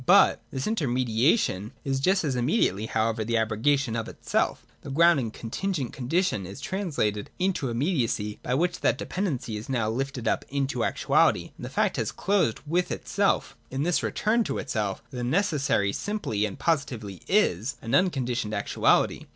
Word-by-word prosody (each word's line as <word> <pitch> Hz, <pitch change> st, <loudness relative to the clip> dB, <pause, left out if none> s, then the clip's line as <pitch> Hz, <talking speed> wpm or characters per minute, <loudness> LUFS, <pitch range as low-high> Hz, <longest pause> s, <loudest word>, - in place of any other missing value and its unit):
But -, -, +6 dB
this 135 Hz, 0 st, -3 dB
inter 215 Hz, -10 st, 0 dB
mediation 120 Hz, -, +1 dB
is 135 Hz, -1 st, 0 dB
just 190 Hz, +7 st, +2 dB
as 140 Hz, -4 st, 0 dB
immediately 120 Hz, -, +1 dB
however^ 110 Hz, 0 st, 0 dB
the 115 Hz, +2 st, 0 dB
abrogation 115 Hz, +3 st, +1 dB
of 115 Hz, -1 st, -2 dB
itself -, -, -1 dB, 0.2 s
The -, -, -9 dB
ground 165 Hz, +2 st, +5 dB
and 115 Hz, -4 st, -2 dB
contingent 135 Hz, -, -3 dB
condition 135 Hz, -, 0 dB
is 95 Hz, -, -9 dB
trans 190 Hz, -5 st, -4 dB
lated 105 Hz, -1 st, 0 dB
into 180 Hz, -8 st, 0 dB
immediacy, 115 Hz, -, -1 dB
by 125 Hz, -, -1 dB
which 175 Hz, +4 st, 0 dB
that 125 Hz, -, +2 dB
dependency 135 Hz, -, -3 dB
is 105 Hz, -, -8 dB
now 115 Hz, -5 st, 0 dB
lifted 130 Hz, 0 st, -3 dB
up -, -, +1 dB
into 135 Hz, -3 st, -1 dB
actuality, -, -, +2 dB
and -, -, -11 dB
the -, -, -5 dB
fact -, -, 0 dB
has -, -, -1 dB
closed 190 Hz, -, +1 dB
with 175 Hz, +4 st, 0 dB
itself. 200 Hz, 0 st, 0 dB
In 135 Hz, +2 st, -2 dB
this 175 Hz, +1 st, +2 dB
return 225 Hz, +2 st, +1 dB
to -, -, -2 dB
itself 105 Hz, -7 st, -2 dB
the 125 Hz, -1 st, -4 dB
necessary 140 Hz, -, +1 dB
simply 190 Hz, -, -1 dB
and 100 Hz, -, -5 dB
positively 120 Hz, -, -1 dB
is, 140 Hz, -, +2 dB
as 115 Hz, -, -4 dB
unconditioned 125 Hz, -, +1 dB
actuality. 100 Hz, -, +2 dB
130 Hz, 165 wpm, -26 LUFS, 110-170 Hz, 0.2 s, But